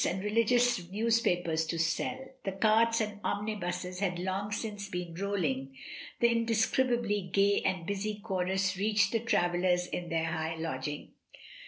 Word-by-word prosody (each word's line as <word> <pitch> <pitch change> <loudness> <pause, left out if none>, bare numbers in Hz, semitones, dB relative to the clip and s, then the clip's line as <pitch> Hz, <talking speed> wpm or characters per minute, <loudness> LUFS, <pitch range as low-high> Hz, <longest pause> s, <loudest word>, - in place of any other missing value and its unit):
51 - - +1
and 190 - -5
religious 230 -3 +2
newspapers 190 -7 +1
to 165 - -2
sell; 170 +10 -1 0.2
the 195 - -2
carts 225 +3 +3
and 210 -1 -3
omnibuses 180 -3 -3
had 185 -3 0
long 190 +3 -2
since 210 -2 -4
been 180 -2 -4
rolling; 155 -9 -2 0.4
the 235 - +6
in 230 0 +2
describably 225 -4 +1
gay 200 +1 +3
and 185 -3 -1
busy 200 +3 -2
chorus 190 -2 0
reached 205 +1 +2
the 230 - +1
travellers 180 -5 +1
in 175 -1 -5
their 165 -1 0
high 160 0 -2
lodging. 150 -3 -4
195 Hz, 150 wpm, -31 LUFS, 175-215 Hz, 0.4 s, the